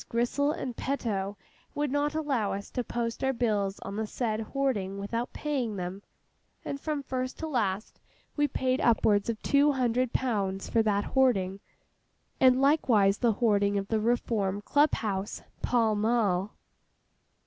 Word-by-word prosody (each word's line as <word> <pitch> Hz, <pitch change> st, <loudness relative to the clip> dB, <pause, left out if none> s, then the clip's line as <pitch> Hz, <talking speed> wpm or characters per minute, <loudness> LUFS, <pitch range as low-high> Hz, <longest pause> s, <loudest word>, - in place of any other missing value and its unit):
Grissell 245 Hz, +5 st, +1 dB
and 255 Hz, -5 st, -4 dB
Peto 205 Hz, -8 st, -2 dB, 0.4 s
would 290 Hz, -2 st, -1 dB
not 290 Hz, +1 st, 0 dB
allow 275 Hz, -10 st, 0 dB
us 200 Hz, +1 st, -6 dB
to 250 Hz, -, -2 dB
post 230 Hz, +1 st, -3 dB
our 265 Hz, 0 st, +2 dB
bills 210 Hz, -5 st, 0 dB
on 200 Hz, +1 st, -6 dB
the 220 Hz, 0 st, -2 dB
said 220 Hz, -1 st, -2 dB
hoarding 220 Hz, -6 st, -1 dB
without 230 Hz, +5 st, -3 dB
paying 265 Hz, -8 st, -2 dB
them—and 195 Hz, +8 st, -9 dB
from 300 Hz, -3 st, -2 dB
first 255 Hz, 0 st, -3 dB
to 320 Hz, -, -4 dB
last 215 Hz, -8 st, -2 dB, 0.4 s
we 290 Hz, -1 st, +2 dB
paid 255 Hz, -2 st, 0 dB
upwards 215 Hz, -3 st, +3 dB
of 225 Hz, -2 st, -2 dB
two 285 Hz, +1 st, +4 dB
hundred 250 Hz, -1 st, +1 dB
pounds 200 Hz, -6 st, -1 dB
for 230 Hz, -, +2 dB
that 205 Hz, -2 st, +1 dB
hoarding, 200 Hz, -8 st, +1 dB, 0.8 s
and 255 Hz, -1 st, +5 dB
likewise 235 Hz, -9 st, +3 dB
the 235 Hz, -3 st, +3 dB
hoarding 205 Hz, -2 st, +2 dB
of 195 Hz, 0 st, -3 dB
the 220 Hz, -, +1 dB
Reform 215 Hz, -3 st, 0 dB
Club 290 Hz, +5 st, +3 dB
house, 200 Hz, -2 st, -3 dB, 0.2 s
Pall 230 Hz, -3 st, +2 dB
Mall." 210 Hz, -3 st, +1 dB
230 Hz, 150 wpm, -28 LUFS, 200-265 Hz, 0.8 s, and